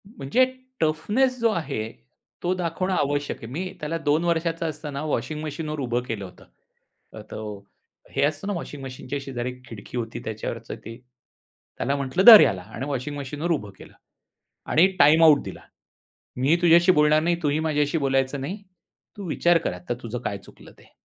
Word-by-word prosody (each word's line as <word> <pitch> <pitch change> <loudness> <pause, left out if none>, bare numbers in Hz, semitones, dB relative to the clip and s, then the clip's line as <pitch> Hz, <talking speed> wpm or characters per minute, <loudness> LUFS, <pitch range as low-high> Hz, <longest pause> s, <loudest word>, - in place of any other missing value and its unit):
म्हणजे 210 - +1 0.3
टफनेस 210 +12 +1
जो 230 0 +3
आहे 140 - -3 0.5
तो 180 +1 +1
दाखवणं 185 +1 -2
आवश्यक 145 -3 -1
आहे. 115 - -10
मी 185 +5 -4
त्याला 150 +1 -3
2 150 +3 +2
वर्षाचा 165 0 0
असताना 150 -2 -5
वॉशिंग 155 0 -2
मशीनवर 155 0 -4
उभं 120 -2 -1
केलं 110 -6 -5
होतं. 90 - -14 0.7
अ, - - -8
तो 105 -2 -6 0.6
हे - - +1
असतं 145 +5 -2
ना, 205 - -1
वॉशिंग 145 -5 -6
मशीनच्या 135 +1 -5
शेजारी 125 -2 -4 0.2
खिडकी 115 +2 -8
होती 115 -1 -4
त्याच्यावरचं 110 +1 -5
ते, 115 0 -8 0.8
त्याला 140 - 0
म्हटलं, 140 +6 0
"धर 225 -3 +13
ह्याला" 95 -4 +2
आणि 130 - -4
वॉशिंग 145 +1 -3
मशीनवर 150 +5 -3
उभं 105 -11 -2
केलं - - -14 0.8
आणि 170 +4 +6
टाईम 155 +3 +6
आउट 155 -3 +6
दिला. - - -8 0.8
मी 135 +6 +3
तुझ्याशी 170 +1 +6
बोलणार 150 0 +4
नाही, 170 +1 +2
तुही 145 +1 +1
माझ्याशी 150 -1 0
बोलायचं 135 0 0
नाही. 175 +9 -4 0.6
तू 200 -3 -6
विचार 175 +2 +3
कर - - 0
आता, 90 +5 -5
तुझं 120 +1 -4
काय 105 -5 -3
चुकलं - - -16
ते. - - -21
145 Hz, 170 wpm, -24 LUFS, 130-165 Hz, 0.8 s, धर